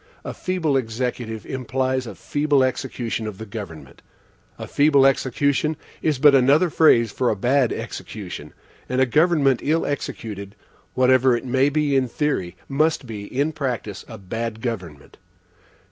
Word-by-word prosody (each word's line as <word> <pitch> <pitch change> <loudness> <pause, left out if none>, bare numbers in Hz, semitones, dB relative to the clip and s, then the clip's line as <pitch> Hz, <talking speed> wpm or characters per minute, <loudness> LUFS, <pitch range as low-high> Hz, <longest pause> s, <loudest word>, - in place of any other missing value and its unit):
A - - -4
feeble 165 -7 0
Executive 115 -2 -3
implies 130 0 -2
a - - -8
feeble 145 -2 +1
execution 120 -3 -2
of 105 -3 -6
the 110 - -7
government. 100 -7 -9 0.6
A - - -6
feeble 145 -2 +4
execution 140 +3 +1 0.2
is 155 -3 +1
but 145 +2 +6
another 140 +6 +4
phrase 115 -9 +4
for 125 +3 0
a - - +1
bad 125 +4 +2
execution; 110 -4 -7 0.4
and 125 +1 0
a 130 - +5
government 150 -1 +3
ill 160 +3 +1
executed, 105 -8 -5 0.4
whatever 130 -1 +4
it 120 - -8
may 130 +2 +2
be 145 -1 +1
in 130 -1 +2
theory, 115 - -2
must 155 +1 +1
be, 105 -4 -7
in 140 +8 -1
practice, 125 -10 -4
a 110 - -9
bad 110 +3 -5
government. 90 - -6
130 Hz, 145 wpm, -22 LUFS, 115-145 Hz, 0.6 s, but